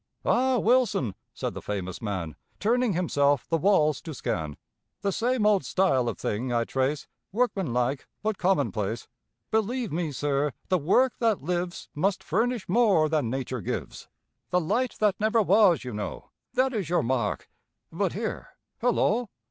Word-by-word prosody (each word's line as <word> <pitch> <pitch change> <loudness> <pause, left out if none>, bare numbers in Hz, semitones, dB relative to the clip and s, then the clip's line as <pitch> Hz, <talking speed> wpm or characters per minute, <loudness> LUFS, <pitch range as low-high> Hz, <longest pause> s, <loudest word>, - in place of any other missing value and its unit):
"Ah, 260 0 +3
Wilson," 230 - +2 0.2
said - - -4
the - - -7
famous 95 -3 -4
man, 95 - -3 0.2
Turning 235 +1 +2
himself 145 -6 +1
the 165 - +1
walls 155 -7 +3
to 160 -3 -7
scan, 80 - -3 0.4
"The 200 - 0
same 235 +2 +1
old 205 -5 +4
style 130 -5 +2
of 115 - -5
thing 120 +5 -2
I 120 -1 +2
trace, 135 +4 -1 0.3
Workmanlike 145 - 0 0.2
but 215 -2 -1
commonplace. 120 - 0 0.4
Believe 220 +2 0
me, 165 0 -1
sir, 145 0 0 0.2
the 185 -1 +3
work 245 - +3
that 225 - +1
lives 175 +2 -2
Must 190 +6 0
furnish 225 +2 0
more 190 -7 +4
than 150 -7 +1
Nature 130 -1 -3
gives. - - -5 0.4
'The 180 - +2
light 225 +9 0
that 210 -3 +2
never 220 +1 +3
was,' 195 -6 +5
you 125 -2 -6
know, 105 -2 -6 0.2
That 260 +1 +2
is 200 -8 -2
your 175 - +2
mark 120 -3 -1 0.4
but - - -1
here, - - -5 0.2
hullo! 240 -1 +2
175 Hz, 155 wpm, -27 LUFS, 130-215 Hz, 0.4 s, was